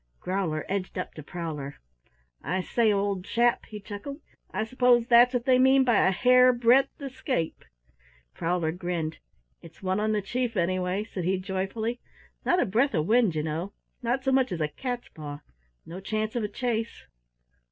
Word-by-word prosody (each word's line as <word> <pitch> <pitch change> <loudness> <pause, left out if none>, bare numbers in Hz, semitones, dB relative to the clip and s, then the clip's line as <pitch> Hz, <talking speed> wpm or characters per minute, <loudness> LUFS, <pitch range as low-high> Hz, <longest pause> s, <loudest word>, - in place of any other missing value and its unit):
Growler 180 -5 -2
edged 190 -1 -3
up 180 - -4
to 155 - -9
Prowler. 150 -3 -6 0.7
"I 185 +1 -1
say, 225 +3 +2
old 200 -2 0
chap," 235 +4 +1
he 210 - -8
chuckled, 210 +8 -7 0.3
"I - - -2
s'pose 245 0 +3
that's 240 +1 +6
what 245 -2 -1
they 255 -1 +4
mean 265 +1 +5
by 240 -4 +3
a - - +4
hare 250 +5 +5
breadth 245 +3 +3
escape?" 265 - -3 0.7
Prowler 165 -1 -1
grinned. 175 -2 -3 0.4
"It's 165 +3 -15
one 190 +1 0
on 215 +1 +1
the 210 -2 0
Chief, 240 +2 -2
anyway," 185 +2 0
said 195 -4 -6
he 190 +1 +1
joyfully. 195 +5 -3 0.4
"Not 355 - +2
a - - +3
breath 230 +4 +1
of 155 -1 +1
wind, 220 -4 +3
ye 155 - -1
know, 165 +6 -3 0.3
not 245 +2 -1
so 265 - +1
much 260 -3 +2
as 175 - -3
a 150 -1 0
cats 245 - -5
paw 145 -1 -8 0.4
no 175 +3 -8
chance 215 +3 -3
of 235 - 0
a - - 0
chase." 230 +1 -3
210 Hz, 175 wpm, -27 LUFS, 180-245 Hz, 0.7 s, that's